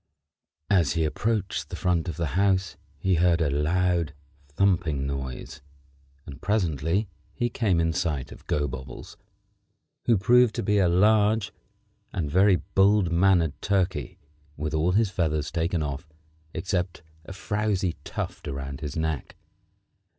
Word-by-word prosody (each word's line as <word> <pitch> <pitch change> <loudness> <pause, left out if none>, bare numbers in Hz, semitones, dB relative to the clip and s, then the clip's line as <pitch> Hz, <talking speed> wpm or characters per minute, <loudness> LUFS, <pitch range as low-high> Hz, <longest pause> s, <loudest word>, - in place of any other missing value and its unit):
As 85 -8 +3
he 80 - +1
approached 100 +6 -1
the - - -5
front 90 -2 0
of 80 - -5
the 85 -4 -1
house 95 0 +1 0.2
he 95 - 0
heard 85 0 +3
a 75 -4 +1
loud, 85 +1 +1 0.3
thumping 80 -3 +1
noise, 65 -2 -5 0.6
and 70 - -10
presently 90 -1 0 0.3
he 120 0 -1
came 100 -9 +1
in 80 0 +1
sight 80 -7 -2
of - - -13
Gobobbles, 65 -3 -4 0.9
who 115 -3 +4
proved 120 +3 +4
to - - -2
be 105 +1 +2
a 90 -3 +4
large 105 +2 +3 0.6
and 75 -5 -3
very 95 +3 +5
bold 95 0 +2
mannered 85 -3 +3
turkey 95 -2 -1 0.4
with 75 +1 -3
all 80 +4 +2
his 105 -1 +2
feathers 75 -5 -1
taken 85 0 0
off 70 +2 -5 0.4
except 90 0 -3 0.2
a - - -9
frowzy 100 -2 -1
tuft - - -5
about 70 0 -5
his 75 0 -5
neck. 80 -4 -2
90 Hz, 135 wpm, -26 LUFS, 75-100 Hz, 0.9 s, very